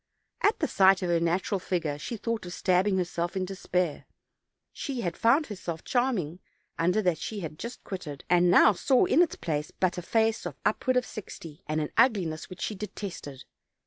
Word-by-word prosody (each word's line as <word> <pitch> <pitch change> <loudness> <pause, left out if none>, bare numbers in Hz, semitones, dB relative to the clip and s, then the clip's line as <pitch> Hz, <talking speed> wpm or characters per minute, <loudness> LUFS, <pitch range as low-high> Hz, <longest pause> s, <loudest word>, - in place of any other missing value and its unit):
At 420 - +3
the - - 0
sight 190 -1 +4
of 180 - -1
her 170 - +3
natural 175 +4 0
figure 165 -6 -2
she 225 +10 -5
thought 220 -2 -3
of 175 - -6
stabbing 190 +2 +2
herself 175 0 -2
in 185 - 0
de 195 - -6
spair; 180 -4 -1 0.7
she 265 -4 -4
had 175 -4 -2
found 270 +7 +3
herself 175 - -6
charming 220 - 0 0.4
under 180 +6 +2
that 180 -4 +1
she 210 -2 -5
had 155 -2 -7
just 235 +2 -7
quitted, 150 -8 -7
and 175 0 +4
now 205 +4 +7
saw 250 +7 +3
in 325 - +4
its 350 - +2
place 150 -2 -3
but 180 -1 -1
a - - -5
face 220 +1 +1
of 155 - -8
upward 255 +4 +1
of 250 - +1
sixty, 165 -7 -9
and 155 +1 0
an 150 - -3
ugliness 185 -11 +2
which 185 - -10
she - - -2
detested. 190 -9 -7
185 Hz, 195 wpm, -28 LUFS, 170-215 Hz, 0.7 s, now